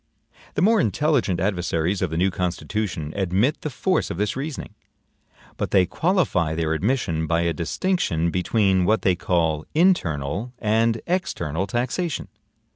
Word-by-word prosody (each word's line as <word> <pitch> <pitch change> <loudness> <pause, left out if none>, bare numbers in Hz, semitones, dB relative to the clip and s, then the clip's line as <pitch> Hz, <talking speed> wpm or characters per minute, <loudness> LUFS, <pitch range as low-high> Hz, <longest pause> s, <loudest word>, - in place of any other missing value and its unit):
The - - +1
more 220 +1 +5
intelligent 130 - +1
adversaries 90 -1 0
of - - 0
the 80 - -3
new 95 +3 +2
Constitution 90 -2 -3
admit 100 - +1
the 155 - -3
force 185 +7 0
of - - -4
this 105 +1 -1
reasoning; 140 +1 -5 0.8
but - - -2
they 95 -2 +4
qualify 100 - +1
their 80 -1 0
admission 85 - 0
by 85 +1 +1
a 85 -1 +1
distinction 85 - 0
between 95 0 +2
what 110 +4 +2
they 95 -2 +3
call 85 -5 0
INTERNAL 110 - +1
and 115 0 +1
EXTERNAL 95 - -1
taxation. 125 - -2
95 Hz, 140 wpm, -23 LUFS, 85-125 Hz, 0.8 s, more